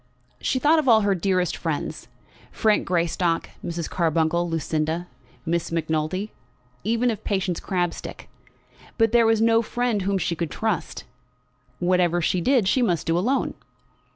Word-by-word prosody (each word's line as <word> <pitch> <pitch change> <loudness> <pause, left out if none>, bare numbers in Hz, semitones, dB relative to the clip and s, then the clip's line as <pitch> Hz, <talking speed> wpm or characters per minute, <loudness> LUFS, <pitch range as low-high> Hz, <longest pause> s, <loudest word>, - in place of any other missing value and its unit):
She - - 0
thought 305 +5 +4
of 300 - -2
all 225 -3 +6
her 200 -1 +2
dearest 185 0 0
friends, - - -4 0.4
Frank 215 -2 +1
Greystock, 170 -1 0
Mrs. 170 -1 -3
Carbuncle, 170 0 +1
Lucinda, 160 +1 -1 0.4
Miss 170 0 -1
Macnulty, 160 +5 -1 0.5
even 230 +4 +1
of 215 - -6
Patience 190 -4 -1
Crabstick, 175 -3 -3 0.7
but 225 -2 +3
there 235 -1 +5
was 225 -1 +3
no 225 0 +4
friend 240 -2 -1
whom 195 +1 0
she 175 -2 -1
could 165 -1 -3
trust. 220 -7 -3 0.7
Whatever 175 0 +2
she 175 +1 0
did 245 0 +3
she 255 - +2
must 175 -9 +1
do 165 - +1
alone! 245 +10 0
185 Hz, 145 wpm, -24 LUFS, 170-225 Hz, 0.7 s, all